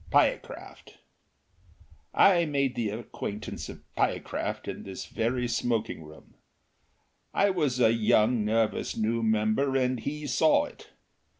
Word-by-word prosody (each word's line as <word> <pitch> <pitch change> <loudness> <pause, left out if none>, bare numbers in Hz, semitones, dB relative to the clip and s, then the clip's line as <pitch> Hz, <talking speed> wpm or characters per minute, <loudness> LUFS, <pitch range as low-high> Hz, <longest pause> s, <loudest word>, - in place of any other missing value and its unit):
Pyecraft. - - -1 1.1
I 175 -3 +5
made 140 -4 0
the 115 -4 -1
acquaintance 105 -1 -6
of - - -10
Pyecraft - - -2
in - - -5
this 95 -1 -7
very 120 +2 -1
smoking 115 -4 -1
room. 75 0 -14 1.0
I 200 0 +4
was 150 -9 0
a 115 -2 +5
young, 110 +1 +3
nervous 110 +1 0
new 115 +1 0
member, 110 +5 +1
and 130 -1 +1
he 150 +5 -4
saw 145 +4 +3
it. - - -14
120 Hz, 120 wpm, -28 LUFS, 110-140 Hz, 1.1 s, I